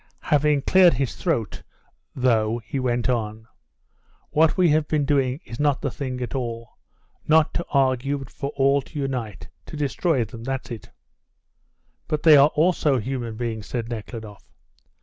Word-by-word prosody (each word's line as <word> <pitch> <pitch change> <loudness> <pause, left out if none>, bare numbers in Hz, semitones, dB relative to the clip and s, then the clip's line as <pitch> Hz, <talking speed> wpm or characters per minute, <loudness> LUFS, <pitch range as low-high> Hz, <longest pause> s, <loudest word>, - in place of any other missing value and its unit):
Having 145 -1 +3
cleared 185 -6 +5
his 135 0 -2
throat 130 - -2 0.5
though, 115 -3 +2
he 135 - -3
went 120 -2 0
on: 110 -3 -2 0.8
"What 160 +4 +3
we 180 -2 +4
have 150 0 +2
been 150 -2 0
doing 135 -2 +1
is 115 - -9
not 145 -2 +2
the 135 - -3
thing 130 -2 -5
at 120 - -4
all. 115 -3 -4 0.6
Not 155 0 +4
to 170 - -2
argue, 135 0 +1
but 135 - -10
for 140 - -5
all 140 +1 +3
to 150 - -12
unite 125 -7 -4 0.2
to - - -8
destroy 145 -2 0
them 115 +2 -10
that's 130 0 -4
it." 115 -5 -8 1.2
"But 155 -1 -2
they 155 -2 +8
are 140 +1 +7
also 155 -4 +2
human 120 -1 -4
beings," 110 -4 -4
said 115 -2 -4
Nekhludoff. 110 -2 -7
130 Hz, 160 wpm, -23 LUFS, 115-145 Hz, 1.2 s, they